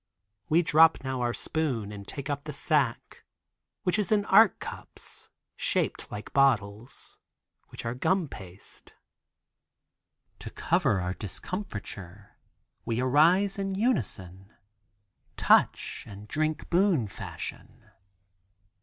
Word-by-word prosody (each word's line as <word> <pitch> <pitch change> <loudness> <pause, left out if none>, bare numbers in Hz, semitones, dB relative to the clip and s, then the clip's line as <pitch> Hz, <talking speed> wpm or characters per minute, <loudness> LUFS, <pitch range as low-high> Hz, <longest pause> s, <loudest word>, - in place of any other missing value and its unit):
We 165 +3 +4
drop 160 -2 +5
now 130 -1 -2
our 120 -1 +1
spoon 120 -7 -2
and 100 -1 -9
take 140 -1 -5
up 145 0 -3
the 150 - -5
sack, 140 -4 0 0.6
which 180 +4 +1
is 205 -2 -1
in 205 -1 +3
Arc 215 +1 +6
cups - - -8 0.3
shaped - - -1
like 105 0 -7
bottles, 120 -4 +1 0.5
which - - -8
are 115 - -1
gum 175 +7 +1
paste. 95 -6 -11 1.5
To - - -7
cover 95 - +1
our 90 +1 -2
discomfiture, 105 - -7 0.5
we 115 0 -1
arise 170 +10 +4
in 195 -1 -2
unison, 100 - -1 0.9
touch - - +3
and 100 0 -10
drink 155 +4 -2
boon 175 - +3
fashion. - - -8
135 Hz, 110 wpm, -28 LUFS, 105-175 Hz, 1.5 s, Arc